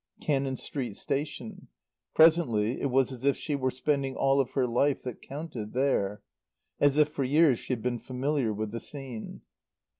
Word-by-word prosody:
Cannon 135 -3 0
Street 125 -7 -4
Station. 140 -5 -4 0.5
Presently 140 -9 +4
it 140 - 0
was 135 +1 +2
as 130 -1 -8
if 140 0 +3
she 150 - -3
were 130 -2 0
spending 135 +1 -1
all 135 0 +3
of 130 -2 +1
her 130 - +2
life 130 +4 +1
that 125 -3 -6
counted 135 -7 -6
there; 105 -6 0 0.6
as 145 0 +4
if 150 -1 +6
for 150 -2 -3
years 145 -1 +4
she - - -6
had 115 - -4
been 120 -1 -1
familiar 130 -1 -1
with 105 0 -3
the 115 - -4
scene. 130 -6 -8
135 Hz, 175 wpm, -29 LUFS, 120-145 Hz, 0.6 s, if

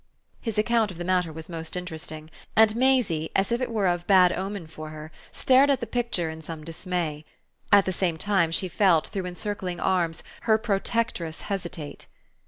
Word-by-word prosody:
His 225 -4 -3
account 220 0 +2
of 185 - -9
the 175 - -4
matter 180 -2 +1
was 160 0 -8
most 165 0 -4
interesting, 160 -2 -7 0.2
and 220 0 +6
Maisie, 235 -11 +2
as 195 +4 +2
if 235 +2 +1
it 255 - -1
were 215 -4 0
of 175 -1 0
bad 185 -3 +6
omen 195 -2 -4
for 155 0 -9
her, 155 0 -9 0.2
stared 265 +2 +4
at 275 - +3
the - - -3
picture 235 -9 -1
in 160 0 -9
some 160 -1 -7
dismay. 165 -2 -3 0.5
At 200 -1 +7
the 185 - -1
same 170 -2 0
time 190 -2 +2
she 185 +3 0
felt, 180 -3 +3
through 190 -2 -3
encircling 180 -1 -4
arms, 170 -3 0 0.3
her 220 - +6
protectress 205 -6 -1
hesitate. 175 -6 -5
180 Hz, 185 wpm, -26 LUFS, 165-210 Hz, 0.5 s, At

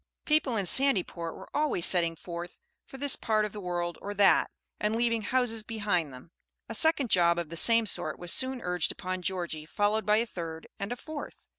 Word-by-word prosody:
People 300 -6 +1
in 200 - -1
Sandyport 185 -9 +3
were - - -11
always 295 - +1
setting 170 -2 +4
forth 170 +1 -8 0.3
for 270 - -10
this 280 0 +1
part 215 -1 0
of 210 - -5
the 210 - -8
world 175 -2 -3
or 205 +1 -6
that, 200 -1 +4 0.3
and 210 +1 0
leaving 230 -1 +1
houses 225 0 0
behind 205 -9 -1
them. 130 +6 -13 0.4
A - - -6
second 285 -1 +2
job 170 -1 +4
of 170 -3 -3
the 165 - -7
same 230 +6 +5
sort 155 -6 0
was 175 -1 0
soon 260 -1 +1
urged 180 -2 0
upon 185 0 -5
Georgie, 175 -4 -4
followed 210 +3 0
by 210 0 +4
a 230 - +1
third 165 -6 -7
and 200 - -4
a - - -2
fourth. 305 +3 -9
205 Hz, 200 wpm, -28 LUFS, 175-230 Hz, 0.4 s, same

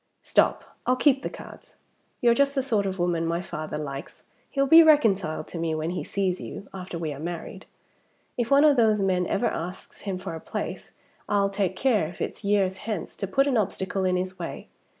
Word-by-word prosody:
Stop! - - +2 0.2
I'll 255 - +4
keep 270 +1 +3
the - - -3
cards. - - -12 0.5
You're 235 -1 +5
just 280 +3 +2
the 270 - +1
sort 215 -7 +1
of 190 0 -3
woman 175 -2 0
my 170 +1 0
father 155 -4 -5
likes. 140 0 -7 0.3
He'll 275 -1 +1
be 320 +4 +9
reconciled 220 - +3
to 170 - -5
me 165 -1 -1
when 155 +2 -2
he 180 - -3
sees 190 -2 -1
you, 200 - -8
after 185 -2 -6
we 160 -3 -3
are 140 - -9
married. 170 +1 -6 0.7
If 240 -2 -1
one 280 +1 +6
of 295 -3 +5
those 220 -3 +4
men 185 -2 +1
ever 220 - 0
asks 180 -1 -4
him 195 -3 -3
for 185 -2 -6
a 160 - -5
place, - - -5 0.4
I'll 200 -1 +2
take 195 -2 -1
care, 215 -7 +2
if 175 - -11
it's - - -4
years 200 -2 +2
hence, 205 -4 -5
to 195 - -3
put 270 +8 +2
an 275 -4 +1
obstacle 190 -2 -1
in 185 -1 +2
his 185 0 -3
way! 170 - -6
195 Hz, 210 wpm, -26 LUFS, 175-235 Hz, 0.7 s, be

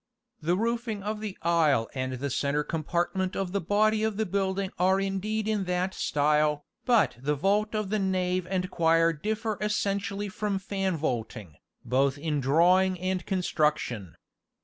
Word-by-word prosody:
The 175 +4 +1
roofing 230 -2 -2
of 210 +1 -3
the 210 -3 -5
aisle 155 -9 +3
and 130 -1 -3
the 135 +2 -3
centre 145 +2 0
compartment 175 +4 -1
of 190 -2 -2
the 200 +1 -1
body 215 +4 +2
of 220 -2 -1
the 220 - +1
building 195 0 -1
are 190 +2 +3
indeed 200 +3 -2
in 210 -3 0
that 180 +1 -1
style, 150 0 +1 0.2
but 235 - +3
the 145 +3 0
vault 205 +8 +1
of 210 -2 -2
the 215 - +1
nave 185 -2 0
and 185 -1 -1
choir 165 0 +3
differ 215 +6 -3
essentially 200 -1 -1
from 205 0 -2
fan 195 -2 -2
vaulting, 115 - -3 0.3
both 135 +3 +2
in 150 0 -1
drawing 180 +7 +3
and 185 0 -2
construction. 150 - -1
185 Hz, 155 wpm, -28 LUFS, 150-200 Hz, 0.3 s, aisle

